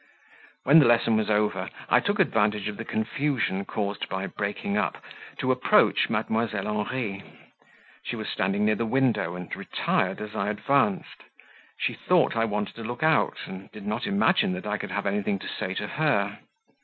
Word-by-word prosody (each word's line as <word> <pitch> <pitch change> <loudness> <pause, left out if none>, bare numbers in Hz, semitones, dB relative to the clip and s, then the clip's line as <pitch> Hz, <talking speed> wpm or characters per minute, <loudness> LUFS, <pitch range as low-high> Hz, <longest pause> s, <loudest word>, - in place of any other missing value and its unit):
When 150 +5 +7
the 145 - +6
lesson 115 -1 +4
was 110 0 0
over, 105 0 +1 0.2
I - - +5
took 205 0 0
advantage 105 - +2
of 105 - -4
the 110 - -5
confusion 110 -3 -1
caused 100 -1 -3
by 95 0 -2
breaking 100 0 -3
up, 105 - 0 0.4
to 130 - +1
approach 125 0 +3
Mdlle. 110 -3 -1 0.2
Henri; 110 -7 -3 0.8
she - - -4
was - - -5
standing 100 +3 0
near 110 - +4
the 115 - -1
window 120 -9 +1
and 90 -1 -6
retired - - -1
as 105 0 -7
I 100 - 0
advanced; 105 0 0 0.6
she - - 0
thought - - +2
I 115 0 +2
wanted 105 -1 -2
to 115 - -6
look 120 +5 -4
out, 160 0 +3
and 95 +1 -9
did 105 -2 -10
not 105 +3 -2
imagine 200 - +3
that 90 - -6
I 105 0 -1
could - - -5
have 100 - -2
anything 100 0 0
to - - -8
say - - -4
to - - -2
her. - - 0
105 Hz, 180 wpm, -26 LUFS, 100-120 Hz, 0.8 s, When